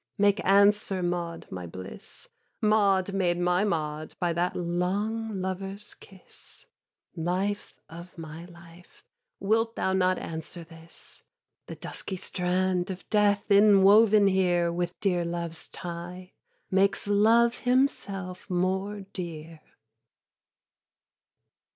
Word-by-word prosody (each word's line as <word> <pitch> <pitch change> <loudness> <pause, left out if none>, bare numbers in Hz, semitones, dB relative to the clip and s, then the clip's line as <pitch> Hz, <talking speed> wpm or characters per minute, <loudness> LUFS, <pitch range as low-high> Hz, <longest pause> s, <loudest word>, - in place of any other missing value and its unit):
Make 205 0 +3
answer, 200 -1 +3
Maud 175 -1 -3
my 90 -1 -6
bliss, 95 +3 -8 0.3
Maud 200 -3 +2
made 180 -3 +1
my 180 +2 +2
Maud 155 -5 -2
by 175 -1 0
that 175 +2 -1
long 195 +5 -2
lover's 195 +2 -4
kiss, 190 -2 -16 0.5
Life 185 +5 -2
of 170 +3 -11
my 165 +1 -8
life, 170 0 -17 0.4
wilt 225 +3 +1
thou 190 - 0
not 185 -1 +2
answer 165 +1 -6
this? 165 0 -10 0.5
'The - - -7
dusky 190 - -6
strand 180 0 -1
of 185 -1 -7
Death 205 -1 +3
inwoven 205 +1 +6
here 175 -3 +2
With 175 0 -3
dear 180 -3 +1
Love's 170 -1 -4
tie, 180 +1 -8 0.4
makes 195 +1 +2
Love 225 +4 +4
himself 200 -8 -1
more 190 +3 -1
dear.' 165 -4 -8
185 Hz, 110 wpm, -27 LUFS, 175-200 Hz, 0.5 s, inwoven